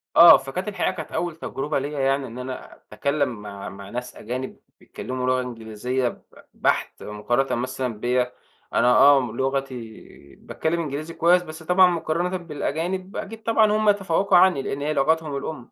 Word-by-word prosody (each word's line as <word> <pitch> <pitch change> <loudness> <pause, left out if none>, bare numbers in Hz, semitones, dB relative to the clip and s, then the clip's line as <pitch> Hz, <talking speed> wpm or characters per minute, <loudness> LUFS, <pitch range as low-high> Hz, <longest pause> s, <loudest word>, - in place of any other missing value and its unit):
آه، 170 -1 +10
فكانت 135 +9 -5
الحقيقة 210 - 0
كانت 160 -3 -7
أول 175 -2 -2
تَجرُبة 145 -2 -3
ليّا 145 +1 -4
يعني 135 0 +1
إن 120 +2 -10
أنا 130 0 -7
أتكلم 125 0 -2
مع 100 -1 -7
مع 100 0 -10
ناس 125 +2 -6
أجانب 125 +4 -6 0.2
بيتكلموا 130 0 -5
لُغة 130 0 +2
إنجليزية 125 +1 -3
ب - - -12 0.3
بحت - - -1
مقارنة 120 +6 -1
مثلًا 125 -3 -4
بيّا. 125 +1 0 0.4
أنا 120 - +3
آه 140 -1 +7
لُغتي 135 0 -2 0.6
باتكلم 165 +2 -3
إنجليزي 155 +2 -5
كويس، 180 +2 +4
بس 160 -1 -10
طبعًا 180 +2 +5
مُقارَنةً 175 +2 -1
بالأجانب 175 +3 -4
أكيد 220 +2 -6
طبعًا 220 -2 +3
هُم 215 0 +3
يَتَفَوَّقوا 195 -2 +3
عني 180 -6 +5
لإن 140 +1 -4
هي 150 +1 -1
لُغتهُم 155 0 +1
الأم. 140 -4 -7
140 Hz, 160 wpm, -23 LUFS, 125-170 Hz, 0.6 s, آه